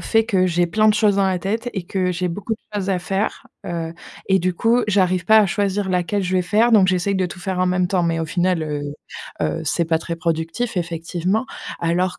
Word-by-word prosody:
fait 225 0 +2
que 195 -5 +2
j'ai 175 -1 +2
plein 215 +5 +3
de 210 - +4
choses 210 -2 +3
dans 195 -1 +3
la 185 -1 0
tête 220 +7 -2
et 190 -4 -4
que 185 0 -1
j'ai 180 0 -2
beaucoup 200 +6 -3 0.2
choses 200 -1 -1
à 185 - +1
faire. 195 +4 -2 0.2
Heu 165 -2 -4 0.4
et 190 0 +4
du 180 +1 0
coup 230 +6 +2
j'arrive 185 -3 +2
pas 220 0 +6
à 210 - +5
choisir 200 +1 -1
laquelle 185 +2 0
je 185 +1 -1
vais 185 - +3
faire, 215 +6 +2
donc 200 -4 +6
j'essaye 185 +2 +1
de 190 -1 +1
tout 180 - -9
faire 180 0 -3
en 185 - +3
même 180 0 +1
temps. 180 0 0
Mais 165 -1 0
au 165 - -1
final, 180 +1 0
heu, 150 -1 -3 0.6
heu, 80 0 -1
c'est 170 +3 0
pas 160 0 +1
très 165 +1 -5
productif 165 +7 -2
effectivement 175 +5 -1 0.3
alors 175 +2 0
185 Hz, 230 wpm, -21 LUFS, 175-200 Hz, 0.6 s, pas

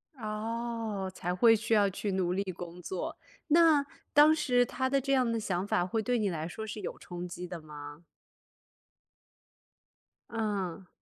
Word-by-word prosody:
哦， 220 -3 -3
才 180 -1 -2
会 225 +5 +6
需 220 +1 -1
要 205 -2 +5
去 200 +2 -3
努 185 -2 0
力 195 +2 0
工 175 0 -8
作。 180 +1 -4 0.3
那 315 -2 +5 0.3
当 300 +2 +8
时 250 -5 +3
他 260 +2 -1
的 275 +1 +3
这 275 +1 0
样 255 -3 +3
的 230 - 0
想 190 -3 -1
法 175 -3 +2
会 220 +5 -1
对 245 +3 +1
你 210 -3 +1
来 160 -3 -3
说 220 +6 -6
是 215 0 -6
有 185 - -5
冲 175 0 -7
击 180 0 -6
的 175 -2 -7
吗？ 150 0 -10 2.3
嗯。 200 -5 -2
210 Hz, 175 characters per minute, -30 LUFS, 180-235 Hz, 2.3 s, 当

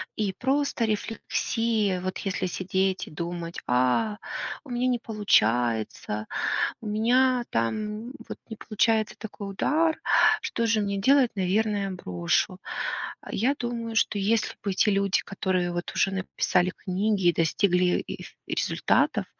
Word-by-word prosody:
и 200 -3 -1
просто 270 -2 +1
рефлексия. 215 -2 -1
Вот 185 0 -3
если 195 -2 -2
сидеть 190 +1 -1
и - - -11
думать: 170 +1 -5
а, 130 - +2 0.5
у 280 - -14
меня 245 +1 0
не 245 -2 +1
получается, 115 - +1 0.5
у 220 - -6
меня 245 +4 +3
там 210 - -2 0.2
вот - - -7
не 220 - -5
получается 220 0 +1
такой 205 -2 -7
удар, 315 +10 +1 0.4
что 235 - -1
же 220 -2 +2
мне 200 -1 -1
делать? 260 +4 +4
Наверное, 200 +1 0
брошу. 90 - -1 0.7
Я 255 +7 +2
думаю, 235 -2 -3
что 210 - +2
если 215 +3 +1
бы 200 - 0
эти 190 - +3
люди, 195 -1 +2
которые 185 -3 -1
вот 175 0 -4
уже 195 - +2
написали 185 -1 +1
книги, 195 0 0
и - - +2
достигли 180 +2 +2
и - - -6 0.2
результатов - - +1
205 Hz, 135 wpm, -26 LUFS, 180-225 Hz, 0.7 s, делать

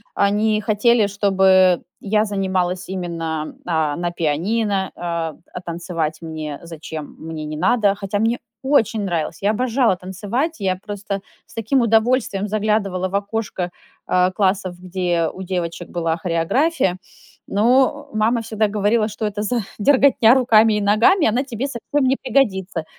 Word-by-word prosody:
они 210 +2 +2
хотели, 220 +1 +3
чтобы 190 -2 +3 0.2
я 210 +1 +1
занималась 185 -3 -1
именно, 165 -4 -4
а, 160 -4 0
на 175 0 -2
пианино, 190 +5 -1
а, 170 -3 -3 0.2
а 180 - -6
танцевать 170 -2 -3
мне, 155 -3 -6
зачем, 160 -2 -8
мне 160 -1 -6
не 150 0 -5
надо. 200 +4 +3
Хотя 200 0 -3
мне 230 +3 +1 0.2
очень 235 -6 +2
нравилось, 170 -5 -3
я 200 +1 +2
обожала 240 -1 +1
танцевать, 205 - -3
я 190 -2 0
просто 200 0 -5 0.2
с - - -19
таким 225 +4 +1
удовольствием 225 -2 +2
заглядывала 205 -3 0
в 195 - -4
окошко, 200 -3 -2 0.4
а, 180 0 +3
классов, 190 -2 0
где 180 -2 -1
у 190 - -8
девочек 175 -2 -4
была 165 -2 -1
хореография, 180 - 0 0.5
но, 260 +7 +2
э, - - -3
мама 230 +2 +2
всегда 220 -1 0
говорила: 210 +2 +1
"Что 215 +1 -4
это 210 0 -3
за 235 +2 0 0.2
дерготня 255 -1 +5
руками 225 -4 +5
и - - -1
ногами? 230 - +4
Она 240 +4 +1
тебе 265 -1 -4
совсем 275 +2 -1
не 265 - +3
пригодится". 195 - 0
200 Hz, 145 wpm, -20 LUFS, 175-225 Hz, 0.5 s, дерготня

